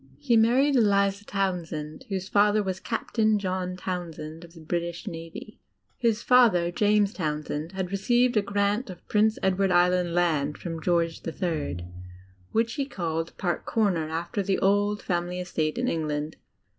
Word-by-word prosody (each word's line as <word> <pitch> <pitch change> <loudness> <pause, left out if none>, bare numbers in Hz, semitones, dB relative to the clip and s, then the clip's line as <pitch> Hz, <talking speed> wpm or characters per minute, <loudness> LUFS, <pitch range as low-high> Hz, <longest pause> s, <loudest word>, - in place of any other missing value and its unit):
He 240 -4 +1
married 250 +6 +4
Eliza 200 -3 +3
Townsend, 170 -7 -3
whose 190 -1 -3
fa 205 +1 +4
ther 210 0 +1
was 190 -1 -3
Captain 220 -1 0
John 185 -2 -3
Townsend 165 -3 -5
of 170 -1 -14
the - - -12
Bridsh 170 +2 -3
Navy. 165 +3 -8 0.4
His 230 -2 0
father, 220 -9 +5
James 210 +1 +2
Townsend, 150 0 -3
had 190 -1 -3
received 240 +5 +2
a 210 - +4
grant 205 +3 0
of 180 -2 -11
Prince 215 +1 +2
Edward 190 0 +2
Island 180 -1 +3
land 155 -5 +1
from 165 -2 -6
George 170 -1 0 0.2
ill, 160 - -1 0.8
which 225 +1 +1
he 280 - -1
called 165 - -3
Park 175 -2 -2
Comer, 190 -9 +1
after 170 +5 -2
the 195 0 0
old 205 +1 +1
family 175 0 -2
estate 155 -4 -2
in 250 +1 0
England. 150 -3 -2
185 Hz, 155 wpm, -26 LUFS, 165-210 Hz, 0.8 s, father